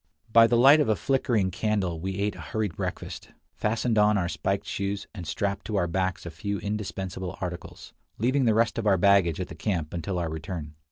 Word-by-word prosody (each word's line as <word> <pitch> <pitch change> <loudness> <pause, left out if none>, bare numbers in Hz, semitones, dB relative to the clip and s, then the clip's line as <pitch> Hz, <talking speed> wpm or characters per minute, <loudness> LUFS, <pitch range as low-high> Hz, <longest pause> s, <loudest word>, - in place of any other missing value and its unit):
By 115 0 +8
the 120 - +3
light 135 +5 +8
of 145 - +2
a 110 - +4
flickering 110 -2 +1
candle 95 -4 -1
we 95 +3 -3
ate 100 +1 -1
a - - -9
hurried 105 -6 -3
breakfast, - - -5 0.2
fastened 110 +1 0
on 105 0 +4
our 90 -3 0
spiked 85 +4 -2
shoes, 100 +1 -3
and 90 -6 -7
strapped 100 +2 -2
to 110 - -3
our 95 -3 +2
backs 95 +1 -2
a 85 - -5
few 100 +4 -3
indispensable 95 -3 -4
articles, 90 -2 -7 0.2
leaving 130 +4 +2
the 110 -2 +3
rest 115 +1 +2
of 110 - -1
our 95 -2 +5
baggage 95 -3 +4
at 90 - -3
the - - -9
camp 85 -2 -2
until 90 +2 -3
our 85 -2 -2
return. 80 -1 -6
100 Hz, 210 wpm, -27 LUFS, 90-110 Hz, 0.2 s, By